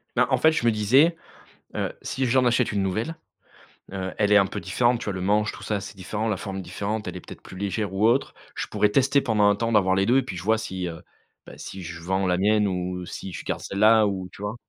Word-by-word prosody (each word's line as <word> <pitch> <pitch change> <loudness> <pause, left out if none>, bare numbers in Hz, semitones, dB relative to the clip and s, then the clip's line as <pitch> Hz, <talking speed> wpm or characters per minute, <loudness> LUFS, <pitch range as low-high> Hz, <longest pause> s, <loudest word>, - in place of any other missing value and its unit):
Bah 125 +1 +3
en 130 - +4
fait, 160 +5 +4
je 120 - -1
me 115 - +5
disais, 130 +11 +3 0.6
heu, - - -2
si 130 - -3
j'en 130 0 +3
achète 120 0 +2
une 100 -1 0
nouvelle, 110 - -2 0.8
heu, 95 -1 -3
elle 105 -1 +2
est 105 - +8
un 100 -1 +4
peu - - -5
différente, 120 +7 +1
tu - - -6
vois? 100 - -2
Le 95 - -5
manche, 105 +3 +1
tout - - -12
ça, 105 -2 -2
c'est 100 +1 -9
différent, 105 +4 -3
la 105 -3 0
forme 95 0 -6
est - - -4
différente, 100 +4 -4
elle - - -5
est - - -5
peut-être - - -12
plus - - -11
légère 100 +1 -3
ou 100 +3 +3
autre. 125 +4 +1 0.2
Je - - -3
pourrais 105 - +1
tester 135 +5 +3
pendant 110 -5 +1
un 105 - +4
temps, 115 +2 -2
d'avoir 95 -4 +3
les 95 +1 +1
2 125 +3 +4
et 135 - +2
puis 100 -7 -6
je - - -5
vois 110 +3 +3
si, 95 -4 -4
heu, 85 0 -8 0.4
bah - - -12
si 95 -1 -8
je 85 0 -8
vends 95 +3 -1
la 90 -1 +1
mienne 105 +1 +3
ou 90 -1 -3
si 95 - -7
je 85 - -8
garde - - -2
celle-là, 110 +2 +4
ou 95 -2 -3
tu - - -14
vois? 105 +2 -3
105 Hz, 270 wpm, -25 LUFS, 95-115 Hz, 0.8 s, est